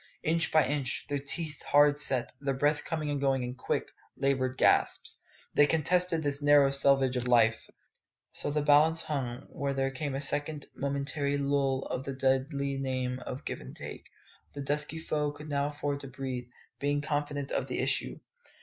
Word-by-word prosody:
Inch 165 +1 +3
by 155 -1 +4
inch, 140 -3 -2
their 145 -1 -1
teeth 150 +2 -3
hard 145 0 +4
set, 130 -4 +4
their 140 -1 -1
breath 145 +2 +1
coming 155 -3 -3
and 145 -1 -2
going 135 -2 +1
in 125 0 -4
quick, 125 - -3 0.3
laboured 130 -1 0
gasps, - - +2 0.3
they 145 - +5
contested 165 +2 +2
this 145 0 0
narrow 145 -1 +5
selvage 135 -1 +4
of 125 0 -2
life. 115 -2 +3 0.6
So - - -2
the 150 0 -1
balance 155 +2 +4
hung, 130 -3 -4
when 140 -4 -3
there 135 0 0
came 135 +1 -4
a - - -2
second 145 +1 +1
momentary 140 +1 -2
lull 140 -1 0
in 130 - -2
the 135 0 -5
deadly 135 +1 0
game 130 -1 -2
of 130 - -6
give - - -5
and - - -11
take. - - -9 0.5
The 140 - -5
dusky 150 +3 -1
foe 150 -2 -2
could 150 +1 -10
now 140 0 0
afford 145 -1 -3
to 140 - -9
breathe, 130 -2 -5 0.3
being 145 +1 0
confident 145 -1 -3
of - - -1
the - - -4
issue. - - 0
140 Hz, 175 wpm, -29 LUFS, 135-145 Hz, 0.6 s, they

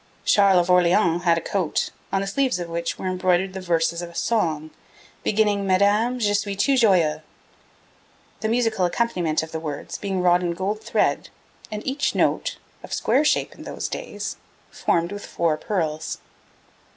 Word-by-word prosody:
Charles 200 -2 +5
of 175 +1 0
Orleans 175 -1 +3
had 170 -1 +4
a - - -1
coat, 185 -4 -1 0.2
on 195 - +1
the - - -2
sleeves 260 +1 0
of 175 -1 -4
which 170 0 -3
were - - -7
embroidered 185 0 +1
the 190 - -5
verses 170 -1 0
of 175 - -6
a 170 - -16
song 160 -10 0 0.5
beginning 205 -2 +1
'Madame, 205 +6 +3
je 210 -4 +1
suis 200 0 -1
tout 275 +7 +2
joyeux,' 180 -10 +3 1.2
the 220 - -1
musical 225 -5 +1
accompaniment 175 -6 0
of 160 - -8
the 160 - -3
words 150 -3 -6
being 195 -2 -2
wrought 175 0 +4
in 175 -1 -1
gold 200 +4 -2
thread, 220 -1 0 0.4
and 210 0 -5
each 275 +2 -1
note, - - +1 0.2
of - - -12
square 285 - +2
shape 300 - +1
in - - -14
those - - -4
days, - - -5 0.3
formed 170 +1 0
with 205 0 -6
four 165 -2 0
pearls. 160 -4 -2
185 Hz, 170 wpm, -23 LUFS, 170-210 Hz, 1.2 s, Charles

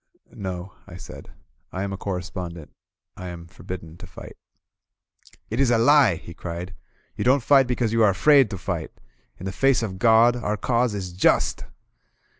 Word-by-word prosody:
"No," 95 -1 -6
I - - -10
said. - - -11 0.4
"I 95 - -4
am 100 0 -3
a - - -3
correspondent. 90 -4 -6 0.4
I 90 - -8
am 85 -1 -8
for 85 - -18
bidden 85 -2 -8
to 90 0 -11
fight." 90 - -12 1.2
"It 115 - -2
is 135 -3 +3
a 120 - +3
lie," 130 - +5
he 85 - -11
cried. 85 +2 -7 0.4
"You - - -3
don't 130 +2 +3
fight 135 -1 +5
because 120 -3 -1
you 115 - +2
are 105 - +6
afraid 135 +5 +4
to 100 - -5
fight. 85 - -4 0.5
In 95 - -9
the 95 - -3
face 135 +5 +2
of 95 -4 -5
God, 115 +1 +5
our 105 -3 -2
Cause 120 -1 0
is 95 -3 -5
Just." 90 - +1
100 Hz, 180 wpm, -23 LUFS, 90-120 Hz, 1.2 s, are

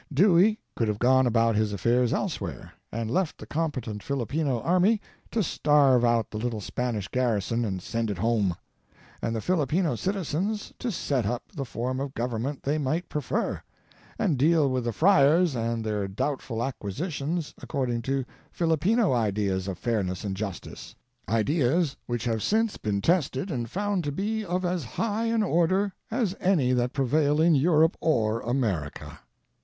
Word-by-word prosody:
Dewey 190 +6 +5 0.2
could 115 - 0
have 105 -1 -1
gone 130 +2 +4
about 115 -1 +3
his 105 -1 +1
affairs 120 +5 +2
elsewhere, - - -3 0.2
and 115 0 -3
left 185 +1 0
the - - -9
competent 130 -10 -3
Filipino 140 +1 -1
army 185 +6 +3 0.3
to 225 - 0
starve 145 -6 +3
out 115 -2 +2
the 105 - -4
little 115 -1 -2
Spanish 110 -1 -3
garrison 115 -1 0
and 95 -5 -3
send 115 -1 -2
it 100 - -3
home, 105 -3 +1 0.7
and 115 0 -1
the 110 - -2
Filipino 165 - +1
citizens 195 - -2
to 245 - -2
set 135 - -1
up 120 +3 -2
the 140 -6 -4
form 125 +2 -3
of 135 0 -4
government 120 +4 -3
they 150 +3 0
might 155 +5 -1
prefer, 150 - -2 0.6
and 170 - +1
deal 155 +1 +4
with 130 -2 -1
the 120 - 0
friars 160 - +4
and 115 -1 -1
their 105 -2 -1
doubtful 115 +2 -2
acquisitions 145 - -3
according 125 -5 -2
to 135 +2 -1 0.3
Filipino 175 - +2
ideas 100 -4 0
of 95 -3 -4
fairness 95 -4 -1
and 100 -2 -3
justice 100 -2 -6 0.2
— 120 0 -48
ideas 140 - +2
which 120 -1 -2
have 115 -2 0
since 220 - +1
been 100 -2 -2
tested 170 - +1
and 120 -5 -3
found 200 - -1
to 145 - -2
be 215 +8 -2
of 185 -1 -2
as 175 -2 -1
high 215 - -2
an 230 -1 +1
order 185 +2 +2 0.2
as 220 -5 0
any 160 -10 +2
tha 125 -1 +2
t - - -14
prevail 145 +3 +2
in 165 +1 +5
Europe 160 +3 +4
or 115 -8 +1
America. 110 - -2
130 Hz, 165 wpm, -27 LUFS, 115-170 Hz, 0.7 s, Dewey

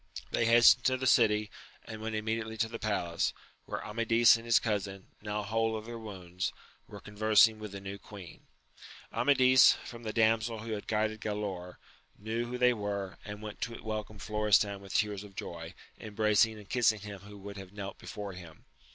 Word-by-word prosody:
They 115 - +1
hastened 120 0 +7
to 130 0 +3
the 130 - -4
city, 105 -4 +3 0.3
and 110 -1 -8
went 110 0 -3
immediately 110 +1 -3
to 115 - +1
the 115 0 -7
palace, 90 -6 -1 0.3
where - - -5
Amadis 115 +2 +4
and 115 0 -7
his 115 -1 +5
cousin, 100 -3 -3
now 105 0 -3
whole 110 +2 0
of 110 - -8
their 120 0 -7
wounds, 90 -4 -5 0.4
were 105 - -10
conversing 110 +1 +3
with 105 -2 -7
the 100 - -7
new 100 +1 -7
queen. 100 -5 -12 0.7
Amadis, 130 -2 +6
from 120 -1 -9
the 110 -2 -4
damsel 110 0 +1
who 115 0 -6
had 105 -1 -4
guided 110 0 -1
Galaor, 100 -4 -4 0.4
knew 115 +3 -3
who 125 +1 -4
they 125 0 +4
were, 100 -3 -4
and 105 +1 -8
went 105 -1 -8
to 115 +1 -4
welcome 110 -1 -5
Florestan 105 -1 +1
with 100 -1 -8
tears 105 -2 0
of 100 -2 -14
joy, 85 -2 -7 0.2
embracing 110 +1 +2
and 105 -2 -13
kissing 110 -3 +2
him 100 -1 -8
who 100 +1 -12
would 100 +1 -9
have 95 -2 -9
knelt 100 -1 -7
before 105 -3 -7
him. 85 -3 -12
105 Hz, 185 wpm, -31 LUFS, 100-115 Hz, 0.7 s, hastened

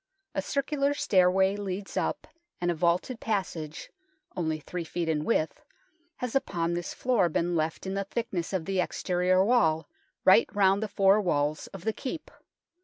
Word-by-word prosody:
A - - 0
circular 280 0 0
stairway 190 -3 +3
leads 200 -1 -5
up, - - -1 0.3
and 175 0 +1
a - - 0
vaulted 175 +9 0
passage, 175 -8 -3 0.4
only 160 -3 -1
3 175 +3 -5
ft. 170 +1 -3
in 155 -2 0
width, 160 -5 0 0.5
has 250 -2 -4
upon 170 -10 0
this 175 0 -3
floor 235 -9 +2
been 170 +2 0
left 160 +2 -1
in 190 - -3
the 195 0 -2
thickness 200 -5 -3
of 185 -4 -2
the 195 -1 -1
exterior 185 +1 +1
wall 165 -9 +3 0.4
right - - +6
round 195 0 +4
the 220 - -1
four 200 +1 +4
walls 150 -4 0
of 195 -3 -10
the 220 - 0
Keep. 295 +7 -6
185 Hz, 165 wpm, -28 LUFS, 170-205 Hz, 0.5 s, right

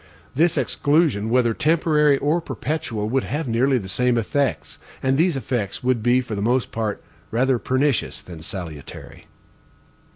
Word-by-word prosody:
This 165 +3 +2
exclusion, 140 -4 +1
whether 120 -1 +3
temporary 150 -1 +3
or 150 +5 +1
perpetual, 130 -6 -3
would 135 +2 +1
have 150 +1 -3
nearly 125 +3 +2
the 100 -6 -5
same 125 +6 +1
effects, 135 +4 -1 0.2
and 130 0 +2
these 165 0 +2
effects 120 -7 -3
would 125 -2 +1
be 120 +3 +3
for 125 -3 -7
the 100 - -3
most 120 +4 +1
part 110 -2 -3 0.3
rather 125 +2 +1
pernicious 130 +1 0
than 85 -3 -10
salutary. 80 -4 -8
130 Hz, 150 wpm, -22 LUFS, 115-145 Hz, 0.3 s, whether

